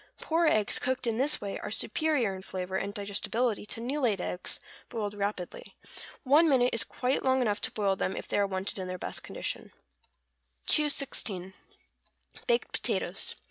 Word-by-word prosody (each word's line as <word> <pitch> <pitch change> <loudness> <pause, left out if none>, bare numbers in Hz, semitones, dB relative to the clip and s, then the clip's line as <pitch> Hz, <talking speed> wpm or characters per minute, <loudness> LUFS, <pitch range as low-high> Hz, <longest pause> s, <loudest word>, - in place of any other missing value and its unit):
Poor 330 +1 +2
eggs 215 -8 +3
cooked 260 0 -1
in 230 0 0
this 290 +3 +3
way 200 -1 -4
are - - -5
superior 240 0 +1
in 190 - -8
flavor 185 0 -5
and 200 +1 -2
digestibility 210 +2 -1
to - - -4
new 260 +6 -2
laid 220 -7 +2
eggs 180 0 -2 0.3
boiled 210 -3 -3
rapidly. 200 -3 -4 0.5
One 305 +4 +5
minute 250 -3 +4
is 230 - +4
quite 250 +5 -1
long 260 0 +3
enough 215 -4 +1
to - - +1
boil 200 -2 +1
them 190 - -1
if - - -6
they - - 0
are 200 - +3
wanted 190 +1 -3
in 185 - -4
their 185 0 -4
best - - -4
condition. - - -5 0.9
216. 245 -11 +3 0.9
=Baked 480 -1 +1
Potatoes. - - 0
215 Hz, 170 wpm, -30 LUFS, 195-260 Hz, 0.9 s, One